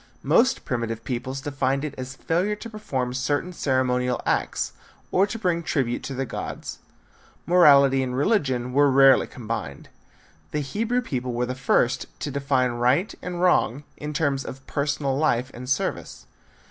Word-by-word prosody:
Most 260 Hz, +2 st, +3 dB
primitive 115 Hz, -2 st, -3 dB
peoples 130 Hz, +2 st, -4 dB
defined 135 Hz, 0 st, -1 dB
it 150 Hz, -, -5 dB
as 130 Hz, 0 st, -7 dB
failure 180 Hz, +9 st, 0 dB
to 230 Hz, +2 st, -9 dB
perform 130 Hz, -, -3 dB
certain 145 Hz, +7 st, -1 dB
ceremonial 125 Hz, -4 st, 0 dB
acts, -, -, -1 dB, 0.4 s
or 195 Hz, +2 st, +3 dB
to 225 Hz, -, -5 dB
bring 180 Hz, -6 st, 0 dB
tribute 130 Hz, -7 st, -1 dB
to 135 Hz, 0 st, -5 dB
the 135 Hz, +1 st, -2 dB
gods. -, -, -6 dB, 0.7 s
Morality 140 Hz, -6 st, +6 dB
and 125 Hz, -1 st, -2 dB
religion 130 Hz, -, +1 dB
were 145 Hz, +1 st, +5 dB
rarely 135 Hz, 0 st, +6 dB
combined. 115 Hz, -, -6 dB, 0.6 s
The 150 Hz, -, -2 dB
Hebrew 225 Hz, -, -1 dB
people 125 Hz, -, -3 dB
were 120 Hz, +1 st, 0 dB
the 125 Hz, -, -3 dB
first 125 Hz, -1 st, +1 dB
to 145 Hz, -, -3 dB
define 135 Hz, -2 st, +1 dB
right 125 Hz, -, +1 dB
and 175 Hz, -1 st, -4 dB
wrong 145 Hz, -6 st, +2 dB
in 150 Hz, 0 st, -6 dB
terms 145 Hz, -3 st, 0 dB
of 130 Hz, 0 st, -9 dB
personal 140 Hz, -1 st, -1 dB
life 130 Hz, -4 st, +1 dB
and 125 Hz, +1 st, -8 dB
service. 130 Hz, -, -2 dB
135 Hz, 155 wpm, -24 LUFS, 125-155 Hz, 0.7 s, Morality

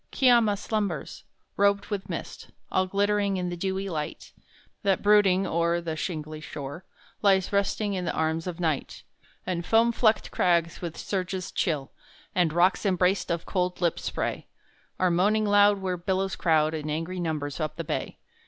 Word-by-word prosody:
Kiama 235 Hz, -6 st, +4 dB
slumbers, 200 Hz, -7 st, -3 dB, 0.3 s
robed 200 Hz, +1 st, +2 dB
with 195 Hz, -2 st, -3 dB
mist, -, -, -6 dB, 0.2 s
All 185 Hz, 0 st, +2 dB
glittering 200 Hz, 0 st, +1 dB
in 180 Hz, -1 st, -2 dB
the 175 Hz, -, -4 dB
dewy 190 Hz, +2 st, -2 dB
light 155 Hz, -5 st, -5 dB, 0.5 s
That, 195 Hz, -3 st, +1 dB
brooding 200 Hz, -2 st, +5 dB
o'er 170 Hz, 0 st, +1 dB
The 165 Hz, -2 st, -4 dB
shingly 155 Hz, -2 st, -5 dB
shore, 145 Hz, +3 st, -7 dB, 0.4 s
Lies 195 Hz, -2 st, +3 dB
resting 200 Hz, +1 st, 0 dB
in 180 Hz, -2 st, -2 dB
the -, -, 0 dB
arms 160 Hz, +2 st, -1 dB
of 180 Hz, -1 st, -5 dB
Night; 160 Hz, -5 st, -2 dB, 0.4 s
And 175 Hz, -2 st, -2 dB
foam 225 Hz, +5 st, +4 dB
flecked 225 Hz, -2 st, +2 dB
crags 170 Hz, -2 st, +1 dB
with 170 Hz, -2 st, -5 dB
surges 185 Hz, -1 st, -3 dB
chill, 150 Hz, -6 st, -1 dB, 0.4 s
And 175 Hz, -3 st, +2 dB
rocks 175 Hz, +3 st, +3 dB
embraced 185 Hz, -1 st, +1 dB
of 170 Hz, -1 st, -2 dB
cold 180 Hz, -2 st, -1 dB
lipped 170 Hz, -2 st, +1 dB
spray, -, -, -3 dB, 0.5 s
Are 185 Hz, -1 st, +3 dB
moaning 210 Hz, +5 st, +2 dB
loud 205 Hz, 0 st, +5 dB
where 185 Hz, -2 st, -2 dB
billows 190 Hz, +2 st, -1 dB
crowd 155 Hz, -2 st, +2 dB
In 155 Hz, -1 st, -4 dB
angry 165 Hz, +4 st, -3 dB
numbers 155 Hz, -4 st, -3 dB
up 155 Hz, -1 st, -2 dB
the 165 Hz, -, -4 dB
bay. -, -, -4 dB
180 Hz, 160 wpm, -27 LUFS, 165-200 Hz, 0.5 s, brooding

